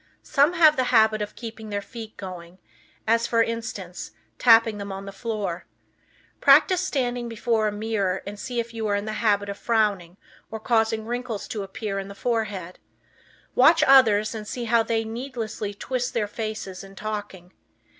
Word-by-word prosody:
Some 290 +4 +3
have 315 -4 +5
the 255 - +2
habit 220 -3 +4
of 210 0 -5
keeping 225 -2 -8
their 205 -1 -2
feet 225 -2 -10
going, 180 -2 -9 0.5
as, 230 +1 +2
for 230 -1 +3
instance, 225 -6 -5 0.3
tapping 225 -3 +5
them 200 0 -5
on 195 +1 -6
the 195 - -7
floor. 195 -4 -4 0.7
Practice 370 -2 +5
standing 245 -9 -2
before 225 -1 0
a - - 0
mirror 205 -3 -1
and 205 +1 -7
see 245 +1 -3
if 235 0 -4
you 225 -1 -3
are 205 - +1
in 200 +1 -2
the 215 - -3
habit 205 -2 +2
of 200 0 -6
frowning 205 -6 0 0.3
or 220 - -6
causing 220 -1 +1
wrinkles 240 -2 -4
to 220 -4 -3
appear 195 +1 -4
in 195 - -6
the 200 - -10
forehead. 205 -7 -3 0.7
Watch 320 +6 +6
others 220 -6 +5
and 215 -2 -7
see 245 - -4
how 230 0 +3
they 225 0 0
needlessly 225 -2 -5
twist 250 +5 -3
their 215 -3 0
faces 215 -3 -5
in 195 0 -13
talking. 205 -4 -6
220 Hz, 175 wpm, -24 LUFS, 200-235 Hz, 0.7 s, Watch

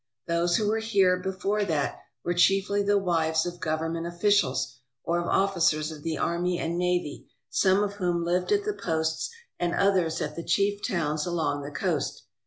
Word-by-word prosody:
Those 170 +1 +1
who 210 - 0
were 220 +1 +1
here 200 -5 +3
before 190 +2 -1
that 155 -7 -1 0.2
were 175 - 0
chiefly 195 +3 +3
the 205 0 +3
wives 165 -3 +1
of 175 0 -5
govern 160 0 -1
ment 165 0 -3
officials 170 -8 +1 0.2
or 170 +1 0
of 175 - -3
officers 165 -5 +2
of 155 -2 -9
the 160 0 -2
army 175 +1 0
and 170 0 -2
navy, 180 -4 -1 0.2
some 190 +1 +3
of 205 0 -3
whom 175 -3 0
lived 180 +1 0
at 410 0 +3
the 420 0 -1
posts 160 - -1 0.3
and 175 -1 0
others 185 -5 +2
at - - -3
the 170 - -4
chief 200 +2 +1
towns 155 -6 -1
along 155 -5 -1
the 145 - -6
coast. 145 - -2
175 Hz, 185 wpm, -27 LUFS, 160-195 Hz, 0.3 s, here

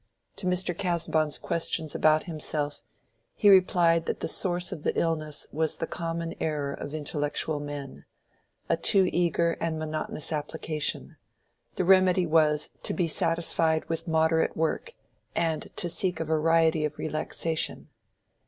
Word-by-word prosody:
To 185 - -3
Mr. 180 -1 +1
Casaubon's 165 -4 0
questions 160 -2 -2
about 155 0 +3
himself, 150 -3 -4 0.5
he 205 -2 +5
replied 175 -3 +4
that - - -2
the - - -2
source 180 -1 -1
of 175 -5 -6
the - - -1
illness 155 -3 0
was 160 0 0
the - - -2
common 165 0 -4
error 145 -3 -2
of 145 +2 -6
intellectual 150 0 -1
men—a 145 -2 -7
too 190 -2 +4
eager 170 -1 +2
and 165 -1 -1
monotonous 155 -1 -3
application: 155 0 -3 0.6
the 185 - 0
remedy 185 -1 +5
was, 155 -2 +2
to - - -1
be 175 - +1
satisfied 165 0 +2
with 165 +1 -2
moderate 160 0 +2
work, 160 - -2 0.4
and 165 -2 -1
to - - -1
seek 180 +1 -1
variety 160 0 +2
of 150 0 -3
relaxation. 155 +1 -3
160 Hz, 135 wpm, -27 LUFS, 155-170 Hz, 0.6 s, he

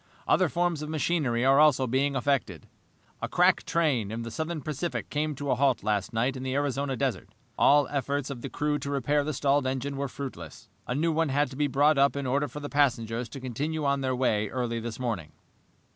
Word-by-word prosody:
Other - - +3
forms 175 -3 0
of 150 - -5
machinery 150 -6 0
are 135 +1 +5
also 150 -4 +5
being 135 +3 0
affected. 135 0 -1 0.6
A - - -3
crack - - +4
train 135 -11 +1
of 115 +1 -4
the 115 - -6
Southern 160 +5 -3
Pacific 155 +3 -4
came 150 0 -1
to 140 0 -3
a - - +3
halt 135 -1 +2
last 105 -2 0
night 125 +4 0
in 130 - -6
the 130 0 -2
Arizona 140 -1 -1
desert. 125 -9 -2 0.3
All 145 0 +5
efforts 140 0 -2
of 125 -3 -7
the - - -5
crew 150 0 -1
to 140 - -5
repair 145 +1 +1
the 155 - -2
stalled 140 -1 +1
engine 135 +1 -3
were 140 0 -1
fruitless. 135 0 -8 0.2
A 125 - -2
new 165 +4 +1
one 160 -1 +1
had 145 +2 +1
to - - -8
be 145 +1 +1
brought 145 +2 +3
up 140 +1 +4
in 140 -1 -3
order 140 +3 +1
for 145 +3 -8
the 145 - -4
passengers 120 -5 0
to 135 - -8
continue 145 +5 -3
on 140 0 +1
their 130 -1 0
way 110 -5 +1
early 120 -2 -2
this 115 0 -6
morning. 110 -12 -3
140 Hz, 220 wpm, -27 LUFS, 125-145 Hz, 0.6 s, are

